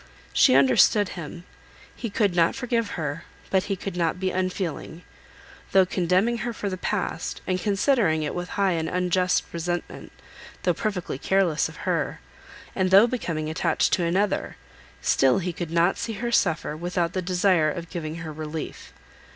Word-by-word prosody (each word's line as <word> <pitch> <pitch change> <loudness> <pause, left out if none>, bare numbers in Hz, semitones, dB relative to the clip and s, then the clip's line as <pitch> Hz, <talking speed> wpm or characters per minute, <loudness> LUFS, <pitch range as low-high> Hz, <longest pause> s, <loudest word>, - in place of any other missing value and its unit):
She - - +5
understood 140 - +5
him. 170 0 -8 0.5
He 235 - -4
could 200 -3 +1
not 170 -1 +3
forgive 235 -5 -1
her, 150 0 -3 0.3
but 190 -1 +2
he 200 - -1
could 190 0 -6
not 170 0 0
be 190 0 0
unfeeling. 180 -2 -3 0.7
Though 190 -1 +6
condemning 185 +6 +1
her 240 0 -3
for 205 -2 -4
the 185 - -3
past, 185 -3 -3
and 185 0 0
considering 200 - +2
it 150 - -3
with 180 0 -4
high 195 -1 +3
and 165 -2 -1
unjust 180 0 +1
resentment, 175 +1 -4 0.5
though 180 - +3
perfectly 180 -6 -3
careless 190 -4 +1
of - - -10
her, - - -1 0.6
and 185 -1 +1
though 195 +4 +8
becoming 170 -11 -3
attached 160 - +1
to 180 - +2
another, 185 +4 0 0.5
still 135 -1 +3
he 180 -2 -2
could 170 -1 -5
not 170 +3 +2
see 225 - -3
her 235 +3 -3
suffer, 160 -8 +1
without 175 +1 -2
the 185 - -1
desire 180 -3 +2
of 170 +2 -6
giving 155 -2 -4
her 165 -2 -6
relief. 155 +1 -6
180 Hz, 165 wpm, -25 LUFS, 165-195 Hz, 0.7 s, though